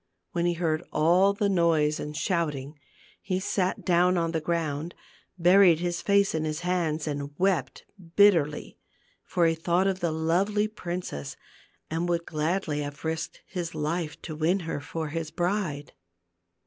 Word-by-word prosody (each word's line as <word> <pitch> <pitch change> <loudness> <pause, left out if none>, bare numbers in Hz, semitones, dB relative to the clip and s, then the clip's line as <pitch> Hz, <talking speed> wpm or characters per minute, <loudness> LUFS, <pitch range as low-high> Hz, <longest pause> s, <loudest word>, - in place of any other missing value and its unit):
When 170 0 0
he 175 - +2
heard 165 -2 0
all 175 +6 +4
the 200 +1 0
noise 165 -5 +2
and 150 0 -5
shouting, 150 -5 -2 0.4
he 185 -1 -1
sat 190 -1 -1
down 180 0 +3
on 165 -1 0
the 160 -1 -1
ground, 160 -1 -2 0.4
buried 180 0 +6
his 175 0 -2
face 200 -1 +3
in 160 -1 -1
his 155 +1 -3
hands, 170 -4 0
and 145 -1 -4
wept 175 -9 0 0.3
bitterly; 170 -8 +3 0.4
for 175 - +1
he 165 - +4
thought 170 +3 +1
of 190 -1 0
the 170 -2 0
lovely 185 +7 +1
princess 175 - -5 0.6
and 165 +2 -1
would 170 -1 0
gladly 155 0 -1
have 145 +1 -6
risked 160 0 -3
his 175 -3 -5
life 155 +1 -2
to 155 - -6
win 170 +5 +1
her 165 -3 -3
for 155 +2 -5
his 160 0 -3
bride. 175 -5 -2
170 Hz, 155 wpm, -27 LUFS, 155-180 Hz, 0.6 s, buried